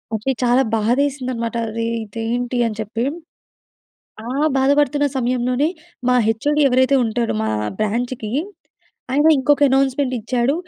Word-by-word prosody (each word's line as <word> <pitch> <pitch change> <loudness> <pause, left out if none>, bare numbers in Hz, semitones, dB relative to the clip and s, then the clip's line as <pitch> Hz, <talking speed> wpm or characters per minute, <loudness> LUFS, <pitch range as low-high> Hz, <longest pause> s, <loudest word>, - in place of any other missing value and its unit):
అది 220 +5 -1
చాలా 245 +1 +3
బాధేసింది 255 +4 0
అన్నమాట. 230 -1 -4
అరె! 230 +1 -3 0.2
ఇదేంటి 230 +4 -3
అని 215 - -5
చెప్పి. 220 +2 -3 1.2
ఆ - - -5 0.3
బాధపడుతున్న 285 +2 +2
సమయంలోనే 250 +3 0 0.4
మా 250 - +4
హెచ్ఓడి 290 +7 +1
ఎవరైతే 260 +2 +3
ఉంటాడో 230 - -1
మా 110 - -1 0.3
బ్రాంచ్‌కి 230 +1 -2 0.8
ఆయన 295 +3 +3
ఇంకొక 290 +2 +2
అనౌన్స్మెంట్ 270 0 +1
ఇచ్చాడు. 245 +4 0
250 Hz, 120 wpm, -20 LUFS, 230-270 Hz, 1.2 s, మా